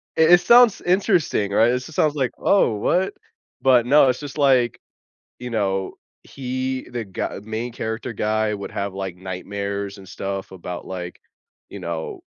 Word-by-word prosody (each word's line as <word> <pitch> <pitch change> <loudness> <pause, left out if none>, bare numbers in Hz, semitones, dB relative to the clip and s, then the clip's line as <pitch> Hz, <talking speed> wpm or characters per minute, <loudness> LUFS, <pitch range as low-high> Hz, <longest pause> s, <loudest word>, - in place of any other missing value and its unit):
it 160 +1 +5
it 175 - +7
sounds 235 +3 +6
interesting, 175 - +1
right? 115 +4 +4
It 125 - +1
just 145 +5 -10
sounds 150 -1 +2
like, 130 -4 0
"Oh, 155 - +3
what?" 185 - +1 0.5
But, 125 -3 +4
no, 140 0 +6
it's 125 - 0
just, 145 0 -8
like, 130 -4 +3 0.6
you 125 0 -6
know, 95 -4 -1 0.3
he 130 0 -4
the 120 -2 -4
gu 95 0 -5
main 110 +3 -4
character 110 +1 -4
guy 110 0 0
would 100 - -6
have, 100 -1 -3
like, 95 -2 -5
nightmares 100 +2 -5
and 95 -1 -13
stuff 95 0 -5
about, 90 -1 -7
like, 90 -1 -7 0.5
you - - -9
know 85 -1 -5
115 Hz, 165 wpm, -22 LUFS, 100-135 Hz, 0.6 s, it